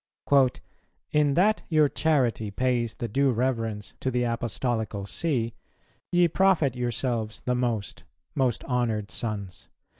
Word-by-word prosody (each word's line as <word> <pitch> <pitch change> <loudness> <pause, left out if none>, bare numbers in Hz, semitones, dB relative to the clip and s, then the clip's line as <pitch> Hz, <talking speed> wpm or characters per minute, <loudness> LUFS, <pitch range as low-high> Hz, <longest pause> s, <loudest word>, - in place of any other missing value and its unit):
"In 150 -2 +3
that 210 +5 +3
your 155 -3 +5
charity 130 -9 +1
pays 120 +1 0
the 120 - -3
due 135 +5 +2
reverence 115 -4 -1
to 130 - -1
the 125 -1 0
Apostolical 115 -3 -2
See, 120 -1 -1 0.6
ye 175 0 +5
profit 170 -7 +3
yourselves 120 -2 -2
the 125 - 0
most, 120 -5 -2 0.3
most 130 -3 0
honoured 115 -5 -1
sons. 100 -7 -4
120 Hz, 120 wpm, -27 LUFS, 110-135 Hz, 0.6 s, your